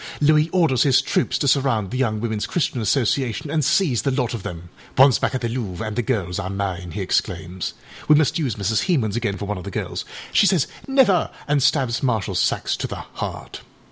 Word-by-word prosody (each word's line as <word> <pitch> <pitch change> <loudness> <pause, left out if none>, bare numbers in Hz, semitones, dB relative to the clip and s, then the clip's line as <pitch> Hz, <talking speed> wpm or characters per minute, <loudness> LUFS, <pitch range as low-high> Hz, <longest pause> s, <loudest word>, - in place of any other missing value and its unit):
âLouis 150 +1 +4
orders 165 -9 +2
his 135 -3 +5
troops 130 - 0
to 140 - -1
surround 130 -7 +1
the 125 - -2
Young 110 -5 0
Womenâs 110 -2 -2
Christian 145 -8 -1
Association 125 +3 0
and 155 -1 +1
seize 150 - +2
the 140 - 0
lot 130 -3 -1
of 115 - -4
them. 85 -1 -7 0.3
âOnce 135 -1 +5
back - - 0
at 130 - -2
the 120 - -1
Louvre 110 -6 -4
and 110 -1 -4
the 120 - +1
girls 100 -8 -2
are 95 - -4
mine,â 95 -3 -3
he 105 - -4
exclaims. 90 -1 -2 0.3
We 150 - +7
must 155 +2 +2
use 130 -9 -1
Mrs. 105 +1 0
Hemans 120 - +1
again 110 -4 -1
for 105 - -5
one 105 -1 -3
of - - -9
the 100 - -6
girls; - - -4 0.3
she 200 - +5
says 180 -8 +3 0.2
âNever,â 260 -10 +3 0.2
and 145 -1 +2
stabs 130 -3 +2
Marshal 115 -7 0
Saxe - - 0
to - - -3
the - - -6
heart. - - -7
125 Hz, 215 wpm, -22 LUFS, 105-145 Hz, 0.3 s, We